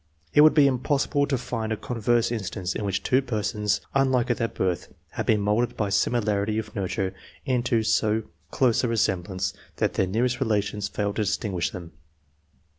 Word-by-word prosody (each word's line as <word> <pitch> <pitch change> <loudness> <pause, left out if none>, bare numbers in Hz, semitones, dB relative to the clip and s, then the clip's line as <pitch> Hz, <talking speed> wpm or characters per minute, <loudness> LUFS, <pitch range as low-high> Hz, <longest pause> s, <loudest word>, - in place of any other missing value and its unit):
It 150 - +7
would 155 +1 +7
be 150 -3 +6
impossible 140 +2 +1
to 135 - 0
find 115 -2 -4
a 110 - 0
converse 120 0 0
instance 100 -4 -3
in - - -4
which 100 -1 -1
two 130 +1 +3
persons, 105 -4 -1
unlike 130 -3 +2
at 120 - 0
their 115 - 0
birth, 90 -5 -2 0.2
had - - -4
been 105 -2 +3
moulded 105 +4 0
by 105 -2 0
simi 100 +5 +2
larity 105 0 0
of 110 -1 -5
nurture 95 -1 -2 0.3
into 125 -4 +1
so 110 0 +1 0.3
close 125 -3 +2
a - - +2
resemblance 95 -4 0 0.2
that - - 0
their 95 - +1
nearest 120 +6 0
relations 105 -2 0
failed 100 0 -3
to - - +1
distinguish 95 - -1
them. 85 +1 -9
110 Hz, 180 wpm, -25 LUFS, 100-120 Hz, 0.3 s, It